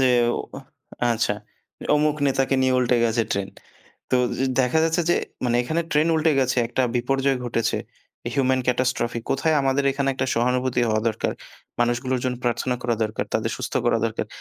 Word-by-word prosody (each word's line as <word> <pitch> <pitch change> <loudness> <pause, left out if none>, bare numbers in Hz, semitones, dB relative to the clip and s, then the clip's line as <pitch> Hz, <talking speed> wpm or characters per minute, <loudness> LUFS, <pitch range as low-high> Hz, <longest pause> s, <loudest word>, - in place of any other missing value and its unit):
যে 130 - +4 0.3
ও - - -1 0.7
আচ্ছা, 110 -2 0 0.6
অমুক 150 0 +2
নেতাকে 135 0 +1
নিয়ে 130 0 +3
উল্টে 125 -1 +2
গেছে 115 0 +2
ট্রেন। 100 -1 -2 0.6
তো - - +4 0.4
দেখা 125 +5 +2
যাচ্ছে 165 +2 +1
যে, - - +5 0.3
মানে 120 0 +2
এখানে 160 +7 -1
ট্রেন 150 +2 +3
উল্টে 160 0 +3
গেছে। 130 0 +1
একটা 125 +2 -1
বিপর্যয় 135 +2 +1
ঘটেছে। 115 -1 0 0.6
হিউমেন 130 -2 +2
catastrophe 125 -2 0
কোথায় 155 +4 +2
আমাদের 135 +1 +1
এখানে 135 0 -1
একটা 130 0 -1
সহানুভূতি 125 +1 +1
হওয়া 110 0 +1
দরকার। 110 - -2 0.5
মানুষগুলোর 120 +2 0
জন্য 125 -1 -1
প্রার্থনা 120 +1 0
করা 120 -1 +1
দরকার। 110 0 -3
তাদের - - 0
সুস্থ - - -5
করা - - +3
দরকার। - - -3
130 Hz, 160 wpm, -23 LUFS, 120-135 Hz, 0.7 s, যে